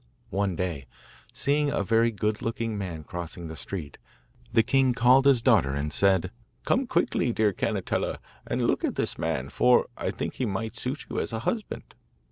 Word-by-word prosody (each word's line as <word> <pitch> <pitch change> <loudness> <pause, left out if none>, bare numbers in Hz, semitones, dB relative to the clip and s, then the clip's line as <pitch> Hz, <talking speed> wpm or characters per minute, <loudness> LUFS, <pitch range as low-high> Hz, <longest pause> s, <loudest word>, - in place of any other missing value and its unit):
One 100 -1 0
day, 80 -7 -3 0.4
seeing 145 +1 +1
a 140 -8 0
very 115 +3 +3
good 105 -1 -2
looking 115 -1 -2
man 90 -6 -5
crossing 85 +1 -6
the 80 - -7
street, 80 -5 -6 0.5
the 115 - +4
king 130 +1 +2
called 125 +3 +5
his 130 -4 +4
daughter 95 - +4
and 75 +1 -3
said: 95 -2 +2 0.3
'Come 260 0 +1
quickly, 170 - +1
dear 110 -3 +2
Cannetella, - - -1 0.3
and - - -1
look - - +1
at - - 0
this - - -2
man, 65 +1 -2
for 125 +9 +4
I - - -3
think - - -4
he 125 - 0
might 110 +3 -3
suit 130 +4 -3
you - - -3
as - - -2
a 110 - -2
husband. 225 -3 -3
110 Hz, 180 wpm, -27 LUFS, 90-125 Hz, 0.5 s, called